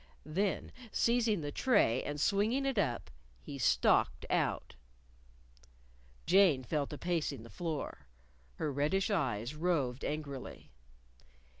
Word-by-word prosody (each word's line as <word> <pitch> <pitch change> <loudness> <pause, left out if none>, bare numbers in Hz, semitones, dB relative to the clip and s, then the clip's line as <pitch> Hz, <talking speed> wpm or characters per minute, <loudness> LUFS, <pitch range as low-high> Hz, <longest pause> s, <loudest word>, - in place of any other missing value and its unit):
_" - - -27 0.2
Then 190 +6 -1 0.2
seizing 230 -5 +2
the 145 -1 -4
tray 175 - +3
and 145 0 -4
swinging 215 - +2
it 270 -6 +1
up, 120 - -1 0.3
he 140 - -8
stalked 120 - +3
out. - - 0 1.5
Jane 180 -8 +5
fell 140 +4 -1
to 150 - -7
pacing 160 -8 -2
the 115 - -12
floor. 155 - -5 0.5
Her 150 - -2
reddish 170 +9 +1
eyes 125 - -1
roved 150 -6 0
angrily. 145 -3 -5
155 Hz, 120 wpm, -33 LUFS, 135-195 Hz, 1.5 s, Jane